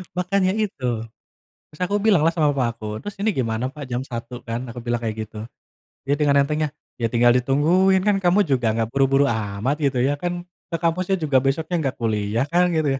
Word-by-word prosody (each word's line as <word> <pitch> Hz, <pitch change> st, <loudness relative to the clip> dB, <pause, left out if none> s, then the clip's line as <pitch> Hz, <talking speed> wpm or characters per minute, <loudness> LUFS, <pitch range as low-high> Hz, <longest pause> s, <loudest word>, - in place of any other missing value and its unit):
Makanya 185 Hz, +1 st, +1 dB
itu. 210 Hz, -11 st, -3 dB, 0.9 s
Terus 150 Hz, -, -18 dB
aku 200 Hz, +3 st, 0 dB
bilanglah 170 Hz, -7 st, +4 dB
sama 155 Hz, -3 st, +3 dB
papa 130 Hz, -3 st, +1 dB
aku. 110 Hz, -2 st, -8 dB, 0.2 s
"Terus 205 Hz, -1 st, -6 dB
ini 215 Hz, +1 st, +2 dB
gimana 115 Hz, -2 st, -1 dB
Pa, 150 Hz, -, -8 dB
jam 125 Hz, +1 st, -1 dB
01.00, 120 Hz, -1 st, -7 dB
kan," 115 Hz, +1 st, -3 dB
aku 120 Hz, -, -8 dB
bilang 120 Hz, 0 st, 0 dB
kayak 110 Hz, -1 st, -2 dB
gitu. 105 Hz, 0 st, -11 dB, 0.7 s
Dia 140 Hz, -, +2 dB
dengan 140 Hz, -2 st, +4 dB
entengnya, 150 Hz, +2 st, -1 dB, 0.3 s
"Ya 115 Hz, -, +2 dB
tinggal 120 Hz, 0 st, +5 dB
ditungguin. 165 Hz, +9 st, +3 dB
Kan 205 Hz, -1 st, +4 dB
kamu 180 Hz, +4 st, +4 dB
juga 125 Hz, -5 st, +1 dB
nggak 115 Hz, -1 st, -1 dB
buru-buru 135 Hz, +1 st, +3 dB
amat," 110 Hz, +3 st, -1 dB
gitu 140 Hz, -3 st, +1 dB
ya, 140 Hz, +2 st, +2 dB
"Kan, 175 Hz, +1 st, -3 dB, 0.3 s
ke 165 Hz, -, 0 dB
kampusnya 180 Hz, +3 st, +1 dB
juga 145 Hz, -5 st, +2 dB
besoknya 155 Hz, +5 st, 0 dB
nggak 135 Hz, -3 st, -2 dB
kuliah, 110 Hz, +2 st, 0 dB
kan?" 180 Hz, +1 st, +4 dB
gitu 155 Hz, -2 st, +1 dB
140 Hz, 195 wpm, -22 LUFS, 120-175 Hz, 0.9 s, tinggal